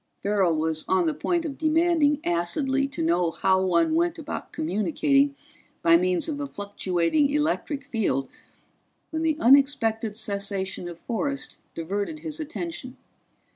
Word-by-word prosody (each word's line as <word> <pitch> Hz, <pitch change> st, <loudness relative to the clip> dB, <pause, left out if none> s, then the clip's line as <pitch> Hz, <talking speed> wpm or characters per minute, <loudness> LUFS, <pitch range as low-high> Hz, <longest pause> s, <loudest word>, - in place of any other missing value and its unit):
Farrell 195 Hz, -5 st, +2 dB
was 160 Hz, 0 st, -1 dB
on 185 Hz, -2 st, +2 dB
the 160 Hz, -, +1 dB
point 345 Hz, -, -1 dB
of 280 Hz, -3 st, -5 dB
demanding 315 Hz, -2 st, +3 dB
acidly 265 Hz, -, 0 dB
to 270 Hz, -11 st, -4 dB
know 170 Hz, +1 st, +2 dB
how 190 Hz, +3 st, +2 dB
one 320 Hz, -, +2 dB
went 340 Hz, +1 st, +1 dB
about 315 Hz, -2 st, -6 dB
communicating 275 Hz, -, +1 dB, 0.5 s
by 165 Hz, 0 st, +6 dB
means 180 Hz, -, +2 dB
of 295 Hz, -3 st, -3 dB
a 285 Hz, -, -3 dB
fluctuating 200 Hz, -, 0 dB
electric 295 Hz, -1 st, -1 dB
field 215 Hz, -, -1 dB, 0.8 s
when 320 Hz, 0 st, -2 dB
the 315 Hz, -2 st, +1 dB
unexpected 230 Hz, -5 st, +3 dB
cessation 200 Hz, -4 st, -2 dB
of 170 Hz, -, -9 dB
forest 275 Hz, +9 st, -3 dB, 0.2 s
diverted 200 Hz, -, -3 dB
his 310 Hz, 0 st, -6 dB
attention. 310 Hz, -4 st, -6 dB
235 Hz, 135 wpm, -25 LUFS, 185-300 Hz, 0.8 s, by